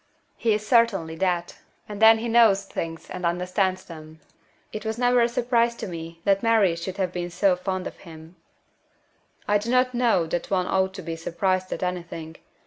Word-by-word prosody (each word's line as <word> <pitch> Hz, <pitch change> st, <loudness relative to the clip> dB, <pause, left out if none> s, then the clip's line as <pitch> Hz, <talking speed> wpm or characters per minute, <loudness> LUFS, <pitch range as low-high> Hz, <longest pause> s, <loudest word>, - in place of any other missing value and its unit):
"He 225 Hz, -2 st, +1 dB
is 215 Hz, 0 st, -4 dB
certainly 215 Hz, -9 st, +2 dB
that. 175 Hz, -2 st, -1 dB, 0.3 s
And 210 Hz, 0 st, -8 dB
then 225 Hz, 0 st, +8 dB
he 230 Hz, +2 st, -4 dB
knows 225 Hz, -4 st, +4 dB
things 165 Hz, -3 st, -6 dB
and 180 Hz, -, -6 dB
understands 180 Hz, +2 st, -1 dB
them. 160 Hz, -1 st, -12 dB, 0.5 s
It 215 Hz, -, -5 dB
was 220 Hz, 0 st, -3 dB
never 245 Hz, 0 st, +3 dB
a 235 Hz, -, +3 dB
surprise 235 Hz, 0 st, +1 dB
to -, -, -6 dB
me 165 Hz, -1 st, -8 dB
that 195 Hz, 0 st, +2 dB
Mary 220 Hz, -7 st, +3 dB
should 180 Hz, +3 st, -6 dB
have 185 Hz, -3 st, -1 dB
been 175 Hz, -1 st, -4 dB
so 180 Hz, +2 st, +2 dB
fond 185 Hz, 0 st, -4 dB
of -, -, -7 dB
him." 160 Hz, -1 st, -13 dB, 1.1 s
"I 205 Hz, 0 st, +3 dB
do 215 Hz, +3 st, -5 dB
not 255 Hz, +1 st, +2 dB
know 235 Hz, -8 st, +2 dB
that 170 Hz, +1 st, -3 dB
one 185 Hz, -2 st, +1 dB
ought 190 Hz, 0 st, 0 dB
to 190 Hz, -, -7 dB
be 165 Hz, -1 st, -4 dB
surprised 185 Hz, +3 st, -1 dB
at -, -, -3 dB
anything. 170 Hz, -3 st, -5 dB
190 Hz, 190 wpm, -24 LUFS, 170-220 Hz, 1.1 s, then